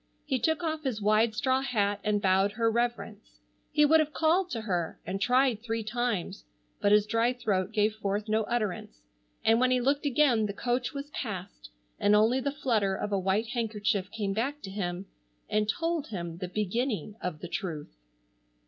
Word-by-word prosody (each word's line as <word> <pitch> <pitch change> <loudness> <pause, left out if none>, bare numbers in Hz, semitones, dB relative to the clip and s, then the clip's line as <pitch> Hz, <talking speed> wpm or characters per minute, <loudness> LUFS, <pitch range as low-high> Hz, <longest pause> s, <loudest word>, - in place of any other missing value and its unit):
He 265 -3 0
took 320 +6 0
off 315 -1 -1
his 260 -7 -2
wide 215 +2 +3
straw 260 +3 +1
hat 205 -6 0
and 210 -1 0
bowed 190 +1 +3
her 230 0 +1
reverence. 235 - -3 0.3
He 300 - +4
would 320 +2 +6
have 305 -1 0
called 345 +4 +2
to 230 - -3
her, 180 -6 -2
and 195 +2 -4
tried 250 0 +3
three 225 -1 -3
times, 220 - -2 0.4
but 205 - +3
his 210 0 +5
dry 230 +3 +1
throat 200 -6 -1
gave 215 0 +2
forth 205 0 -2
no 215 +1 +2
utterance, 205 - -3 0.4
and 225 +1 +5
when 255 0 +3
he 255 0 +3
looked 280 +4 +1
again 250 -6 +3
the 200 - -4
coach 245 +3 -1
was 285 +1 -7
passed 185 - -6 0.3
and 205 +1 +4
only 225 +5 +4
the 280 +2 -1
flutter 225 -9 0
of 210 - -4
a 200 - +1
white 195 +4 0
handkerchief 210 -5 -1
came 205 -2 -2
back 270 +8 -2
to 195 - -6
him 185 -1 -3 0.4
and 210 0 0
told 330 +2 -1
him 170 -5 -5
the 185 - -3
beginning 215 - -2
of 180 -4 -4
the - - -5
truth. 160 - -5
220 Hz, 185 wpm, -29 LUFS, 200-255 Hz, 0.4 s, would